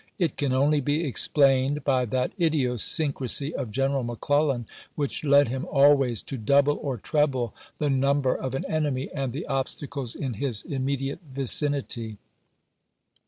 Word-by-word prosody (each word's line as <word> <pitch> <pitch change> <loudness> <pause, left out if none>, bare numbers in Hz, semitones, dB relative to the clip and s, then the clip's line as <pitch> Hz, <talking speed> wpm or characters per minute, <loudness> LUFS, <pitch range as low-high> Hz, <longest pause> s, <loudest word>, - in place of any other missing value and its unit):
It 170 -5 0
can 140 -2 -1
only 145 +3 +2
be 145 +5 0
explained 135 +1 +3
by 130 -3 +2
that 125 +2 -1
idiosyncrasy 140 -1 +1
of 125 - -4
Gen 135 +5 0
eral 135 -2 -1
McClellan 130 +2 0 0.3
which 145 0 -3
led 140 -3 +5
him 130 +2 -3
always 135 -5 +4
to 135 - -6
double 140 +6 +3
or 135 -4 -3
treble 130 -2 0 0.2
the 150 -2 0
number 135 0 +2
of 130 0 -4
an - - -3
enemy 145 -4 -2
and 135 -3 -2
the 145 +8 -5
obstacles 135 -1 -3
in 130 -4 -3
his 125 -7 -2
immediate 135 0 -3
vicinity. 130 -4 0
135 Hz, 145 wpm, -26 LUFS, 130-145 Hz, 0.3 s, led